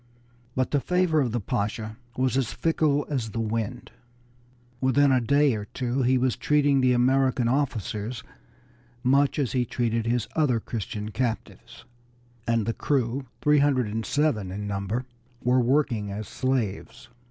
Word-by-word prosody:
But 130 0 0
the 145 - +3
favor 180 +2 +2
of 125 -4 0
the 120 - -1
Pasha 110 +2 -3 0.2
was 130 0 +1
as 130 -4 0
fickle 155 -3 +1
as 130 -7 -2
the 115 - -4
wind; 110 -1 -3 0.9
within 135 +2 +3
a 130 -1 +3
day 140 +3 +3
or 105 -2 -4
two 125 +4 -2
he 130 +1 +3
was 125 -1 +1
treating 145 -3 +2
the 130 -1 +4
American 130 0 +2
officers 120 -3 -2 0.8
much 135 +2 +3
as 140 -5 0
he 125 -2 +1
treated 115 -1 -1
his 120 -1 0
other 140 -7 +2
Christian 105 -1 -5
captives, 120 -1 -4 0.6
and 115 -2 +1
the 115 - -1
crew, 130 0 -1 0.2
three 150 0 +5
hundred 140 -3 +3
and 110 +2 -3
seven 120 -12 0
in 105 +2 -5
number, 100 +5 -2 0.4
were 125 +1 +3
worked 135 +2 +2
as 105 -1 -4
slaves. 120 -2 -2
125 Hz, 155 wpm, -26 LUFS, 110-140 Hz, 0.9 s, three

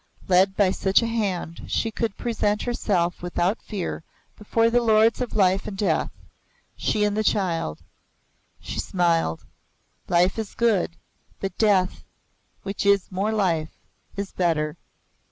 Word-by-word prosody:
Led 190 +1 +4
by 195 -3 +4
such 195 +4 +2
a - - 0
hand, 200 -7 -2
she 225 - -1
could 220 -1 -3
present 210 -3 0
herself 185 -8 0
without 175 +4 -1
fear 195 -6 -4 0.3
before 225 +2 +1
the 245 +1 +3
Lords 220 +1 +4
of 250 - -3
Life 190 -2 +2
and 195 - -6
Death 205 - +1 0.7
she 210 - 0
and 205 0 +1
the 215 - +1
child. 170 - 0 0.8
She - - -6
smiled. 165 - 0 0.6
Life 180 +4 +2
is 220 -2 -5
good, 210 -8 +1 0.4
but 195 -2 -4
death, 195 -4 +2 0.6
which 195 0 -3
is 200 -1 +3
more 195 +4 -1
life, 170 -7 0 0.4
is 200 -1 -4
better. 155 -4 0
195 Hz, 135 wpm, -24 LUFS, 180-215 Hz, 0.8 s, Led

